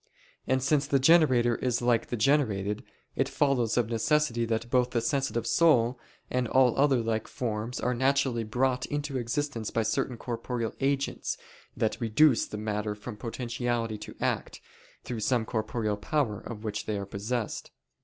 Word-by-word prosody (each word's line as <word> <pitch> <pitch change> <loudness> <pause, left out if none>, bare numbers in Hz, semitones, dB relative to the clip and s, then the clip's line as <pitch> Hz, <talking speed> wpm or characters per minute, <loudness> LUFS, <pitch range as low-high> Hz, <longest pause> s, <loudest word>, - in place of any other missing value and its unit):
And 130 -1 +1
since 140 +1 +2
the 140 - +3
generator 130 -5 +5
is 125 -1 0
like 120 -1 +2
the 120 - -3
generated, 105 -6 +1 0.3
it - - +1
follows 125 -6 +1
of 120 -3 +2
necessity 120 +1 +1
that 115 +1 -2
both 125 -1 +3
the 120 - 0
sensitive 120 -2 -1
soul, 125 -7 +3 0.3
and 125 -1 -1
all 130 0 +4
other 135 -4 +3
like 110 -1 -1
forms 115 0 -3
are 125 - 0
naturally 130 -2 +1
brought 125 +3 0
into 145 -2 -2
existence 120 -1 -2
by 115 - 0
certain 115 +3 -1
corporeal 115 -1 -3
agents 140 0 -1 0.4
that 110 +3 -1
reduce 120 +4 +4
the 105 - -6
matter 105 0 -2
from 105 +2 -8
potentiality 120 -1 -3
to - - -9
act, - - -2 0.4
through 120 -3 -4
some 115 +1 +1
corporeal 110 -2 -2
power 110 -1 -1
of 110 -2 -8
which 105 -1 -4
they 105 -1 -1
are 100 - -4
possessed. 105 +4 -3
120 Hz, 160 wpm, -28 LUFS, 110-130 Hz, 0.4 s, generator